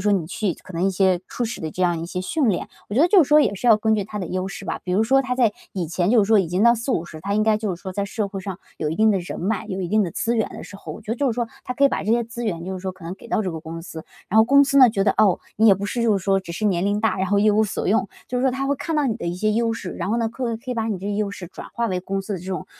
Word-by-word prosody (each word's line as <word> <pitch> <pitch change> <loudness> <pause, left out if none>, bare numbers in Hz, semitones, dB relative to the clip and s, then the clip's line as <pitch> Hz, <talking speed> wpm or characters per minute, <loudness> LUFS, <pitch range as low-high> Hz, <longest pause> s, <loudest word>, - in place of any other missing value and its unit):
说 205 +1 +3
你 185 -5 0
去 190 +1 -2
可 - - -14
能 170 +1 -2
一 195 - +3
些 185 -1 +2
初 245 - -3
始 230 - -5
的 160 - -4
这 185 - -3
样 175 -2 +1
一 165 - -5
些 180 +1 -4
训 280 - 0
练。 180 - 0 0.2
我 205 - -5
觉 260 - +3
得 - - +6
就 365 0 +6
是 280 - -3
说 300 - +7
也 210 -9 +3
是 205 - -4
要 225 -3 +7
根 220 +1 +1
据 205 - -1
他 210 +1 -6
的 185 - -3
优 185 +2 -3
势 195 0 -8
吧， 165 - -4
比 180 - -3
如 210 +4 +3
说 270 +4 +4
他 250 -1 -2
在 240 -4 +3 0.2
以 180 -3 -2
前 175 +3 0
就 225 -3 +5
是 - - -5
说 220 - +6
已 190 - +2
经 180 +5 0
到 235 0 +6
40-50， 175 - -3
他 200 +4 -2
应 215 - +2
该 215 -1 +3
就 210 -5 -2
是 - - -21
说 190 - -5
在 200 +1 -2
社 210 +1 -2
会 195 -1 -6
上 190 -1 -6 0.2
有 155 - -1
一 160 - -3
定 220 +2 +4
的 200 - +2
人 175 - -6
脉， 210 +3 -2
有 195 -2 -4
一 175 - -3
定 215 +3 +3
的 180 - -2
资 230 +8 -1
源 220 - +1
的 - - -9
时 - - -12
候， - - -9
我 - - -8
觉 215 - -3
得 - - -3
就 280 - 0
是 - - -2
说 240 0 -1 0.2
他 250 - -4
可 280 - +3
以 - - +7
把 - - -2
这 210 - -1
些 235 0 +2
资 235 +1 -6
源 170 -5 -3
就 190 - -4
是 190 - -4
说 190 0 -4
可 185 -2 -15
能 170 +2 -5
给 215 - -14
到 215 - +1
这 190 - -2
个 160 -1 -6
公 165 +1 -7
司。 160 -2 -9 0.3
然 215 - +4
后 - - +9
公 280 +3 +6
司 275 0 +2
呢 255 -2 +9
觉 195 -3 0
得： - - +4
“哦， 205 -5 +4 0.2
你 220 - +4
也 200 - +8
不 195 +2 -5
是 235 +3 -2
就 220 -3 +3
是 195 - -4
说 195 -1 +3
只 175 -3 -8
是 215 - -4
年 180 -3 +1
龄 205 +1 0
大， 220 -3 +1
然 190 - 0
后 200 +2 +2
一 210 +1 +4
无 215 +1 +3
所 200 - -3
用。 195 -1 +2 0.2
“就 250 - -1
是 - - -1
说 265 - +4
他 270 +2 -2
会 280 - +1
看 325 +4 -3
到 300 -2 +2
你 225 -4 -1
的 230 - -6
一 170 - -2
些 215 +4 0
优 230 +1 +1
势， 195 -5 -5
然 - - -4
后 225 - +1
呢 230 -1 0
可 235 0 -3
可 235 +3 -8
以 - - -1
把 225 -1 -1
你 215 - -1
这 195 - -6
些 205 - -1
优 205 -1 -1
势 195 -3 -8
转 - - -10
化 235 0 0
为 185 -3 -1
公 195 +1 -3
司 205 +1 -4
的 - - -4
这 175 - -11
种， 185 -4 -4
205 Hz, 405 characters per minute, -22 LUFS, 185-230 Hz, 0.3 s, 后